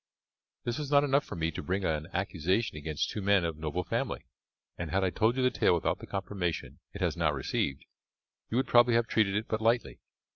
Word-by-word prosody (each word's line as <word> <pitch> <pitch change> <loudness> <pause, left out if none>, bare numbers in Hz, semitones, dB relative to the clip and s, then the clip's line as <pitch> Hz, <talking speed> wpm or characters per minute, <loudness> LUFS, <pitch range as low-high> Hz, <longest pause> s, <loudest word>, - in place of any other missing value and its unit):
This 120 +4 -2
was 145 -2 -4
not 140 0 +5
enough 140 0 +3
for - - -8
me 80 0 -1
to - - -5
bring 95 +1 -1
an 75 0 -1
accusation 95 +2 0
against 75 0 -2
two 105 - -4
men 100 -2 +3
of 80 -1 -2
noble 80 +3 -3
family; - - -2 0.5
and, 85 -2 -5
had 95 +4 +1
I 95 - +1
told 115 +6 +2
you 130 - +2
the 125 - +4
tale - - +3
without 85 - 0
the - - -10
confirmation 95 -3 -3
it - - -9
has - - +1
now 85 -3 +2
received, 70 0 -2 0.6
you 115 - -1
would 130 - +2
probably 120 -1 +5
have 115 0 +3
treated 105 -3 +1
it 105 +2 -1
but 110 0 -2
lightly. 115 +2 +1
95 Hz, 220 wpm, -30 LUFS, 85-115 Hz, 0.6 s, not